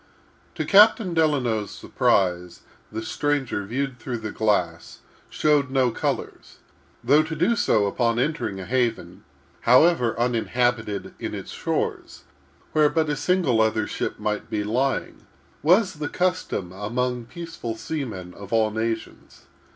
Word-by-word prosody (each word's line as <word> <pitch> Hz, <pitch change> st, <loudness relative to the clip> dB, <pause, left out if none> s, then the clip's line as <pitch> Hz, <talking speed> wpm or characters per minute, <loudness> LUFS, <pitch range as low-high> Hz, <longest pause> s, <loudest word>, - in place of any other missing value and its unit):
To -, -, -2 dB
Captain 205 Hz, -1 st, +5 dB
Delano's 130 Hz, -10 st, +1 dB
surprise, 90 Hz, -2 st, 0 dB, 0.3 s
the 110 Hz, +1 st, -4 dB
stranger, 135 Hz, -5 st, -1 dB
viewed 130 Hz, +2 st, -3 dB
through 120 Hz, +1 st, -4 dB
the 110 Hz, -2 st, -5 dB
glass, 90 Hz, -6 st, -1 dB, 0.3 s
showed 150 Hz, -3 st, +2 dB
no 130 Hz, -2 st, +2 dB
colors; -, -, -4 dB, 0.5 s
though 140 Hz, +6 st, +5 dB
to 160 Hz, +1 st, -4 dB
do 180 Hz, +10 st, +2 dB
so 105 Hz, -, +2 dB
upon 115 Hz, +3 st, 0 dB
entering 130 Hz, -7 st, -1 dB
a 95 Hz, -, -6 dB
haven, 115 Hz, -7 st, -1 dB, 0.4 s
however 125 Hz, -2 st, +4 dB
uninhabited 120 Hz, -3 st, 0 dB
in -, -, -4 dB
its -, -, -7 dB
shores, -, -, -3 dB, 0.5 s
where 150 Hz, -1 st, +4 dB
but 160 Hz, -1 st, 0 dB
a -, -, 0 dB
single 155 Hz, -9 st, +2 dB
other 110 Hz, -1 st, +1 dB
ship -, -, -4 dB
might 105 Hz, -1 st, -3 dB
be 105 Hz, -1 st, -1 dB
lying, 130 Hz, +6 st, -2 dB, 0.3 s
was 185 Hz, +6 st, +4 dB
the 150 Hz, -1 st, -5 dB
custom 180 Hz, -, -1 dB
among 120 Hz, +5 st, -2 dB
peaceful 165 Hz, -6 st, -7 dB
seamen 110 Hz, -, -5 dB
of 100 Hz, -1 st, -11 dB
all 110 Hz, -1 st, +2 dB
nations. 110 Hz, +1 st, -4 dB
120 Hz, 135 wpm, -24 LUFS, 110-150 Hz, 0.5 s, Captain